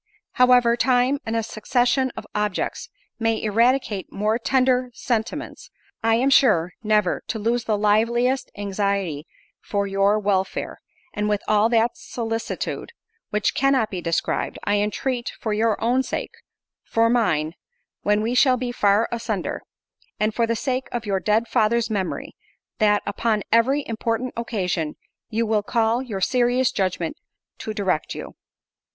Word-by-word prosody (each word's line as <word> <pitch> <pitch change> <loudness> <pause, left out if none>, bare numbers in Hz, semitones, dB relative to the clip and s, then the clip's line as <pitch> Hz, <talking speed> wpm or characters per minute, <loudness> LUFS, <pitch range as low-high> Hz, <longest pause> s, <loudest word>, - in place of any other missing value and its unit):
"However 250 -2 +5
time, 255 +2 +2
and 225 - -1
a 225 - 0
succession 245 +4 +1
of - - -6
objects, 210 -2 -2 0.3
may 225 -1 +1
eradicate 225 -1 +1
more 215 +3 0
tender 255 0 +2
sentiments, 245 - -3 0.3
I 225 0 +3
am 260 +4 +2
sure 185 -11 +4
never 210 -4 +1
to 225 - -2
lose 230 +2 0
the 215 -2 +1
liveliest 235 +5 +2
anxiety 200 -6 -2 0.3
for 200 -1 -1
your 195 +1 +2
welfare—and 205 +1 -3
with 210 -1 0
all 215 +1 +3
that 230 0 +3
solicitude, 225 - -4 0.4
which 210 0 0
cannot 270 -5 +2
be 185 -2 -4
described, 165 -1 -1
I 205 0 +1
entreat 235 +4 -2
for 220 - -2
your 220 0 +1
own 245 +3 +2
sake, - - -4 0.5
for 230 0 +2
mine—when 210 - -1
we 230 +2 0
shall 255 0 +4
be 250 0 -3
far 210 -1 +3
asunder—and 215 -1 -4
for 230 +1 +1
the 230 - 0
sake 260 +2 -2
of 240 -2 -3
your 195 -2 0
dead 220 +4 +1
father's 235 0 +1
memory, 195 -4 -3 0.4
that, 210 -1 +3
upon 210 0 0
every 265 +5 +3
important 230 +2 -2
occasion, 180 -9 -2 0.3
you 230 0 0
will 215 -1 +1
call 225 +3 +1
your 215 -7 -5
serious 250 +3 +2
judgment 185 -4 -2 0.4
to 220 - -4
direct 190 -6 -1
you. - - -7
225 Hz, 140 wpm, -23 LUFS, 205-245 Hz, 0.5 s, However